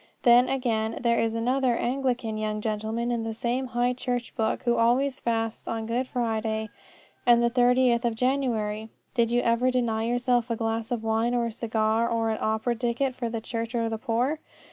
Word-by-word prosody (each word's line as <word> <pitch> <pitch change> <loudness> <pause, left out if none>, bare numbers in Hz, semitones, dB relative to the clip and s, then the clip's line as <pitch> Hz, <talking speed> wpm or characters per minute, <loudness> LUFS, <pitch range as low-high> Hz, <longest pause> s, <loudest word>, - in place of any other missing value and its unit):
Then, 245 0 +6
again, 225 -4 -1
there 235 -1 +3
is 225 0 0
another 250 +1 +1
Anglican 245 -3 -1
young 215 0 -2
gentleman 220 +2 -2
in 235 -1 -1
the 225 -1 -4
same 245 +3 -1
High 245 0 +1
Church 245 -1 -3
book 220 0 -1
who 240 -1 +2
always 255 +4 +2
fasts 225 -1 -2
on 225 -1 -3
Good 240 +3 -1
Friday 220 -3 -2 0.5
and 240 -1 +5
the 235 - +2
Thirtieth 245 -1 +3
of 235 -2 0
January. 225 -4 -1 0.2
Did 235 -2 +2
you 240 +1 +2
ever 235 +2 +2
deny 235 -3 0
yourself 245 0 +1
a 230 - 0
glass 225 0 -2
of 240 -3 -2
wine 225 +2 +1
or 240 -1 +1
a 230 - -3
cigar 225 0 0
or 225 -1 0
an 220 - -3
opera 220 +2 0
ticket 240 +3 -1
for 240 -2 -3
the 225 -1 -4
church 230 +1 -4
or 230 -1 0
the 225 -1 -3
poor? 250 +6 0
235 Hz, 190 wpm, -26 LUFS, 225-245 Hz, 0.5 s, Then